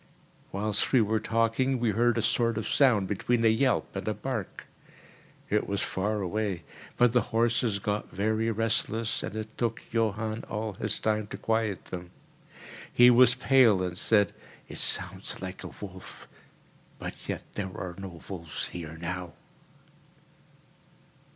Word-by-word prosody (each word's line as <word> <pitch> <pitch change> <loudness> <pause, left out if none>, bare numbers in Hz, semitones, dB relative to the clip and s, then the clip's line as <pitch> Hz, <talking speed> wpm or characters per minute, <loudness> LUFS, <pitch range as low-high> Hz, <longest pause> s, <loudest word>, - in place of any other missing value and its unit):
Whilst 105 +1 0
we 130 - +6
were 110 0 +2
talking, 115 +4 +1
we 115 -2 +2
heard 120 +3 +2
a 115 - +1
sort 115 -1 +2
of 110 - -2
sound 115 -9 +4
between 115 +4 0
a - - +7
yelp 125 +1 +1
and 95 - -4
a 110 - 0
bark. 120 -8 -5 0.9
It 105 - +1
was 100 0 0
far 105 +2 -1
away; 100 -1 -2 0.3
but 120 -1 +4
the 125 - +5
horses 115 -1 +2
got 105 +1 -2
very 110 +4 0
restless, 115 0 0
and - - -5
it 110 0 -6
took 115 -2 -1
Johann 110 0 -1
all 110 0 -3
his - - -1
time 110 -1 0
to - - -7
quiet 110 -4 -1
them. 90 -1 -7 0.8
He 125 0 +7
was 125 0 +6
pale, 125 -7 +5
and 90 -1 -3
said, 105 +2 +2 0.3
"It - - -4
sounds - - +1
like 95 0 -7
a - - -5
wolf—but 95 -2 -12
yet - - -3
there 100 -2 -3
are 90 -1 -5
no 90 -4 -8
wolves 85 -5 -3
here 80 -2 -7
now." 90 0 -5
110 Hz, 150 wpm, -28 LUFS, 100-115 Hz, 0.9 s, a